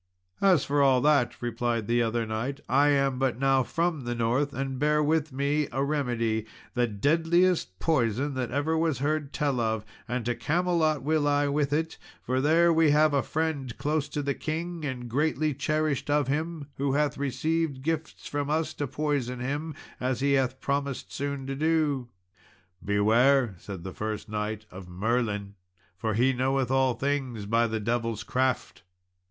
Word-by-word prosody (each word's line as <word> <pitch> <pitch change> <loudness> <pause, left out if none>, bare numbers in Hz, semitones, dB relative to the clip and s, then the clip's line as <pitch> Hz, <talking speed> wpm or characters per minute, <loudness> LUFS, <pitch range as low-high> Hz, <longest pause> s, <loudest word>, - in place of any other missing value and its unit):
"As 185 -8 +4
for 145 0 +1
all 135 -2 +5
that," 145 -5 +2
replied 120 -1 -1
the 120 +2 +2
other 115 0 0
knight, 115 +6 -3
"I 140 +4 +4
am 135 -2 +2
but 130 -4 +1
now 135 0 +3
from 165 +2 -1
the 120 0 -3
north, 120 +5 +1
and 135 0 -3
bear 150 +1 +3
with 155 0 +1
me 140 +2 0
a 135 +3 0
remedy, 120 -7 -1 0.3
the 120 -1 +2
deadliest 165 - +2
poison 135 - +1
that 130 -2 -2
ever 145 +5 0
was 160 -4 +1
heard 145 +1 -1
tell 140 -4 0
of, 110 -2 -1 0.2
and 120 -1 -2
to 120 - +1
Camelot 155 +2 +1
will 155 0 +1
I 145 0 +2
with 145 0 0
it; 160 +2 -1 0.2
for 130 +1 0
there 165 +4 +4
we 160 -1 +4
have 150 +1 +4
a 140 - +3
friend 150 -6 -2
close 150 0 -1
to 145 0 -3
the 140 0 0
king, 165 +3 -4
and 125 -3 -4
greatly 150 +4 0
cherished 155 +1 -1
of 145 -2 +2
him, 155 +2 -2
who 140 0 0
hath 150 0 0
received 140 +1 -1
gifts 160 0 -3
from 145 0 -2
us 155 +1 0
to 145 - -3
poison 135 -3 -2
him, 145 +5 -3 0.2
as 130 -1 -1
he 140 +1 +1
hath 130 -1 +1
promised 140 -1 -2
soon 140 -1 -3
to 135 0 -3
do." 150 -4 +1 0.7
"Beware," 115 +4 +3
said 95 -3 -8
the 95 0 -6
first 110 0 -4
knight, 105 0 -3
"of 90 -1 -10
Merlin, 105 +1 -1 0.4
for 110 +2 -2
he 130 +4 +3
knoweth 130 0 0
all 130 -2 +3
things, 135 -6 -2
by 115 +3 +2
the 110 0 -2
devil's 115 0 -1
craft." 130 0 -1
135 Hz, 170 wpm, -27 LUFS, 120-150 Hz, 0.7 s, all